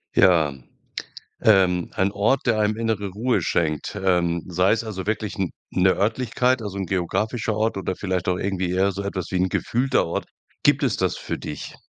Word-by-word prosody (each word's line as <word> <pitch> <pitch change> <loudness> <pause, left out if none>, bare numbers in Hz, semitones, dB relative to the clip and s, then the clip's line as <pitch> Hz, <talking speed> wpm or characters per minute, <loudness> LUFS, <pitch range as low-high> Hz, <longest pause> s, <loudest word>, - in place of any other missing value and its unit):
Ja, 80 -6 +5 0.9
ähm, 95 -5 +4
ein 95 +1 +1
Ort, 105 +7 +1
der 110 -3 +3
einem 105 0 +2
innere 110 -3 -1
Ruhe 115 +6 0
schenkt, 80 +2 -1
ähm, 85 -2 +2
sei 90 +2 +2
es 115 +1 +1
also 100 -5 -5
wirklich 110 -1 -2
n 95 -3 -1 0.2
'ne 95 0 +4
Örtlichkeit, 125 +4 +1
also 100 -2 -5
'n 95 - -3
geografischer 105 +5 -1
Ort 110 0 0
oder 95 -1 -2
vielleicht 95 -2 -2
auch 90 - +1
irgendwie 95 -1 -1
eher 95 +2 +2
so 100 +1 -5
etwas 95 -3 -4
wie - - -2
'n 90 +1 +2
gefühlter 125 +8 +1
Ort. 85 - -3 0.4
Gibt - - +4
es - - +1
das - - 0
für - - -4
dich? - - -7
95 Hz, 185 wpm, -23 LUFS, 90-110 Hz, 0.9 s, Ja